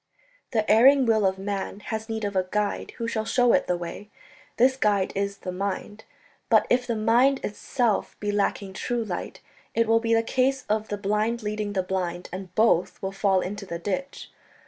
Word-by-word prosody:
"The 220 -3 0
erring 265 +5 +6
will 220 -3 +3
of 190 0 -1
man 195 0 -4
has 220 +1 -5
need 220 -1 -3
of 200 -1 -3
a 185 -1 +1
guide 210 0 -2
who 230 - -3
shall 220 -2 -1
show 245 +1 +3
it - - +2
the 180 - +1
way... 175 +4 -7 0.5
this 260 +2 +4
guide 205 -6 +1
is 200 0 -2
the 185 - -6
mind. 200 +3 -4 0.4
But - - +5
if 245 0 +2
the 235 - 0
mind 240 +5 +3
itself 225 +1 -1
be 205 0 -1
lacking 200 -1 -1
true 240 +4 -2
light... 180 -4 -5 0.3
it 230 0 +2
will 225 0 +4
be 230 0 +1
a 225 - +2
case 260 +3 0
of 215 +1 0
the 205 - -3
blind 210 +3 -1
leading 210 -1 -3
the 190 -2 0
blind, 180 -1 -3
and 185 -1 -7
both 180 -5 +2
will 190 +1 -3
fall 195 -1 +2
into 200 +2 -5
the 170 - -4
ditch 270 +11 -4
210 Hz, 195 wpm, -25 LUFS, 195-230 Hz, 0.5 s, erring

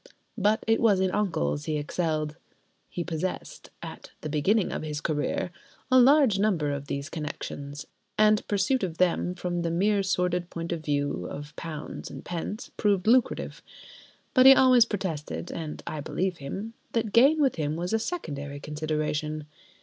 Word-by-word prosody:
But 210 +2 +2
it 225 0 +3
was 210 -5 +4
in 190 -1 +2
uncles 75 - 0
he 155 - -1
excelled. 155 0 -1 0.5
He 175 - -3
possessed 175 +2 -4
(at - - -8
the 155 - -4
beginning 185 +8 +2
of - - -3
his 150 -1 -4
career) 160 +4 -1 0.4
a 255 - +7
large 260 -5 +6
number 180 -9 +1
of 140 0 -4
these 140 +1 -3
connections, 145 -2 -6 0.3
and 215 0 +4
pursuit 210 +6 +1
of 175 -4 -3
them, 180 0 +1
from 175 -1 -2
the 170 - -1
mere 200 +5 +2
sordid 180 -2 0
point 170 0 -5
of 165 -2 -3
view 145 - -1
of 145 0 -8
£ 165 +3 -5
s. - - -10
d., - - -27
proved 200 -4 +2
lucrative. 245 +2 +2 0.7
But 255 0 +7
he 270 - +11
always 255 -3 +6
protested 180 -7 -4
(and 155 -2 -6
I 155 - -4
believed 180 +4 -2
him) 195 +11 -5 0.2
that 225 -3 -1
gain 275 +7 +6
with 275 -8 +2
him 150 -1 -1
was 175 +4 -3
a 225 - +3
secondary 145 - -4
consideration. 150 0 -2
175 Hz, 165 wpm, -27 LUFS, 150-210 Hz, 0.7 s, he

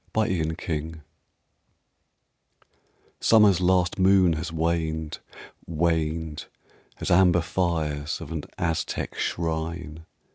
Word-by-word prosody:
BEFORE 110 -3 +1 0.2
AUTUMN 80 -1 -5 2.2
Summer's 105 -5 +5
last 90 0 +2
moon 95 -2 +5
has 80 +1 -4
waned 80 -1 -2 0.5
Waned 80 -1 -1 0.5
As - - -2
amber 90 -1 +5
fires 80 -5 -1
Of - - -9
an 80 -3 -4
Aztec 80 -1 -2
shrine. 80 -1 -3
80 Hz, 85 wpm, -25 LUFS, 80-90 Hz, 2.2 s, Summer's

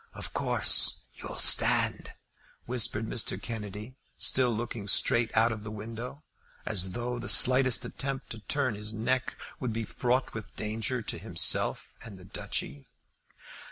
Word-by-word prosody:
"Of - - -7
course - - +3
you'll - - -8
stand?" - - +3 0.5
whispered 115 -3 +1
Mr. 110 +1 -1
Kennedy, 105 +2 -7 0.2
still 130 -1 +3
looking 115 -2 -4
straight 115 +3 +4
out 115 +1 +4
of 110 -2 -5
the 105 - -7
window, 115 +6 -8 0.4
as 95 -3 0
though 120 0 -4
the 120 - -4
slightest 130 -1 +5
attempt 135 -1 -5
to 115 - -7
turn 130 +2 -1
his 105 +2 -3
neck 130 +4 -1 0.2
would 125 -4 -3
be 115 +1 -3
fraught 125 +4 -1
with 110 -2 -9
danger 110 +3 -2
to - - -6
himself - - +1
and 105 -4 -10
the 90 - -14
Duchy. 70 -6 -5
115 Hz, 145 wpm, -29 LUFS, 105-125 Hz, 0.5 s, slightest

